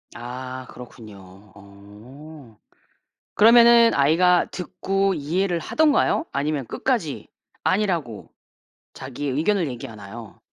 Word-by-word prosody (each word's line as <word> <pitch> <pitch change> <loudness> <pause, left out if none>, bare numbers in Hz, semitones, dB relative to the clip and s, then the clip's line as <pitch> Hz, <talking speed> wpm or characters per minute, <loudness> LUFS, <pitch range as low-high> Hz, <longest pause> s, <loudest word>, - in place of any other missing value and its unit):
아 130 +2 -8
그렇군요. 105 -5 -14
어. 110 +7 -15 0.8
그러면은 235 +1 +6
아이가 170 +6 +3
듣고 195 +2 -2
이해를 170 +4 -2
하던가요? 310 - +1
아니면 145 -1 -2
끝까지 - - -3 0.4
아니라고 175 - -2 0.6
자기의 135 +2 -6
의견을 175 +4 0
얘기하나요? 115 -3 -10
140 Hz, 245 characters per minute, -22 LUFS, 115-185 Hz, 0.8 s, 그러면은